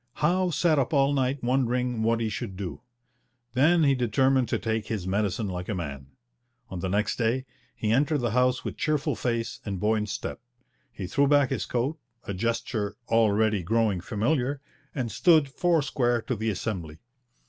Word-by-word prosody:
Howe 180 +4 +2
sat 160 -1 +2
up 135 +3 0
all 140 0 +3
night 135 -1 0
wondering 125 -1 0
what 115 +1 +1
he 115 - 0
should 95 -2 -5
do. 95 -3 -5 0.7
Then 160 +6 +4
he 140 -2 +4
determined 130 +1 +2
to - - +1
take 110 -1 -2
his 105 -5 -3
medicine 100 +2 0
like 90 -1 -5
a 105 - -1
man. 70 -6 -5 0.6
On 95 - -5
the 95 - -2
next 105 +3 0
day 125 +3 0 0.3
he 110 - -1
entered 145 +6 +3
the 120 -5 -1
House 125 +1 +2
with - - -4
cheerful 150 -2 0
face 115 -2 -2
and 100 -3 -4
buoyant 105 +1 +1
step. 105 - -4 0.5
He 95 - -6
threw 140 +10 +2
back 145 -2 +4
his - - -2
coat, 135 +6 -1 0.2
a 100 - -4
gesture 115 0 -2
already 110 -2 +3
growing 105 0 +1
familiar, 125 - 0 0.4
and 125 -5 -2
stood 160 -5 +4
four 165 +3 +1
square 120 -4 +1
to 125 - -2
the 110 +1 -1
Assembly. 90 -6 -4
115 Hz, 175 wpm, -27 LUFS, 105-135 Hz, 0.7 s, Then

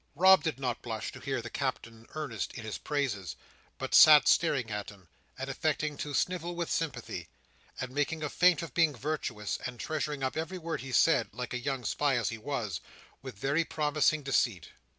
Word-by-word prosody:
Rob 190 +4 +7
did 155 -6 -2
not 125 -3 -2
blush 110 -3 -4
to - - -11
hear - - -3
the - - -7
Captain 115 0 -4
earnest 155 -2 -4
in 120 - -7
his 110 -1 -5
praises, 120 - -2 0.4
but - - -5
sat 150 -1 +9
staring 135 -9 +3
at 105 -1 -4
him, 95 -4 -16 0.3
and 135 +1 -4
affecting 150 +2 -1
to 145 0 -4
snivel 175 +1 -1
with 170 -1 -3
sympathy, 120 - -3 0.5
and 130 -1 -4
making 145 +3 -1
a 150 - -1
feint 180 -3 +4
of 165 - -8
being 165 -4 +3
virtuous, 125 -6 -3
and 125 -2 -9
treasuring 150 -2 -3
up 130 - -1
every 165 +4 -3
word 165 -1 -4
he 135 - -7
said 135 -2 +4
(like 125 -1 -5
a 125 - -2
young 135 -2 -2
spy 140 +4 +1
as 120 - 0
he 115 - -6
was) 110 - -3 0.4
with 130 -5 -9
very 140 +9 +1
promising 150 -1 +1
deceit. 120 - 0
140 Hz, 190 wpm, -30 LUFS, 120-155 Hz, 0.5 s, sat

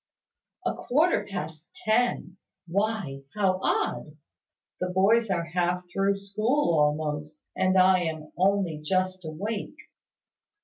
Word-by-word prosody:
"A - - +1
quarter 300 - +1
past 160 -4 -6 0.2
ten! 220 -5 +1 0.3
Why, 190 -6 -1
how 190 -3 +2
odd! - - -1 0.6
The 180 - -1
boys 205 +5 +3
are 175 -3 0
half 180 +2 -1
through 195 0 +2
school, 215 +4 0
almost, 150 0 -1
and 185 0 +2
I 185 0 +6
am 155 -1 -5
only 185 -4 +1
just 185 +2 0
awake!" 200 +7 -4
185 Hz, 115 wpm, -27 LUFS, 160-200 Hz, 0.6 s, I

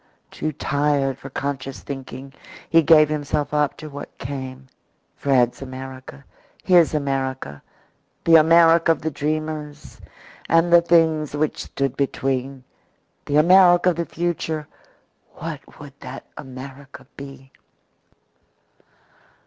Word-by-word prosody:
Too 155 - -3
tired 145 -2 0
for 135 - -9
conscious 135 -4 -5
thinking, 135 0 -8 0.3
he 165 - +5
gave 155 -1 +6
himself 145 -1 -2
up 150 -1 +1
to 155 - -9
what 145 -1 -10
came 130 0 -7 0.5
Fred's 125 -3 +1
America, 130 - -9 0.4
his 175 -4 +4
America, 130 - -3 0.6
the 165 - +3
America 165 +1 +5
of 155 - -11
the 160 - -1
dreamers 150 0 -4 0.5
and 165 +1 +3
the 170 - +8
things 160 -3 +2
which 150 +1 -1
stood 135 -2 -2
between. 135 -1 -2 0.6
The 145 - +1
America 180 +2 +6
of 170 - -6
the 170 -2 -2
future 160 -3 -3 0.7
what - - -8
would 145 -2 -11
that 130 -1 -9
America 135 +1 -10
be? 135 -1 -11
145 Hz, 115 wpm, -22 LUFS, 135-155 Hz, 0.7 s, the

